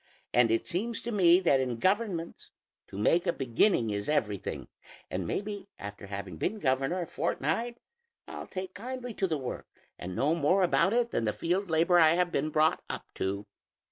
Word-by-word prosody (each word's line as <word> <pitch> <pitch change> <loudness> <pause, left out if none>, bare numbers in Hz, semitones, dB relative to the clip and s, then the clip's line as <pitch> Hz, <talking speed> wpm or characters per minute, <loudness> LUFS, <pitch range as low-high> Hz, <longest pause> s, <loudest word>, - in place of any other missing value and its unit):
And 120 -1 +5
it 115 0 +1
seems 225 +7 -1
to 235 - -3
me 180 -4 +6
that 135 -7 +4
in 125 -3 -1
governments, 190 - -1 0.4
to - - -9
make 165 +12 +2
a - - +4
beginning 125 - +2
is 100 +3 -3
everything; 105 -10 -1 0.4
and 90 -2 -2
maybe 205 - -4
after 100 0 -8
having 100 -4 -6
been 215 - -1
governor 135 +2 0
a - - -2
fortnight, 225 - -2 0.5
I'll - - -7
take 185 0 -6
kindly 250 +3 -6
to 195 - 0
the 160 -3 -1
work 130 -3 -6 0.3
and 90 +1 -6
know 145 - +2
more 170 +4 +3
about 190 +3 +3
it 235 0 +1
than 115 - 0
the 105 - 0
field 180 +3 -1
labor 170 +2 +4
I 160 0 +6
have 180 0 +1
been 150 0 0
brought 155 +1 +2
up - - -6
to." 100 +2 -3
165 Hz, 185 wpm, -29 LUFS, 115-190 Hz, 0.5 s, me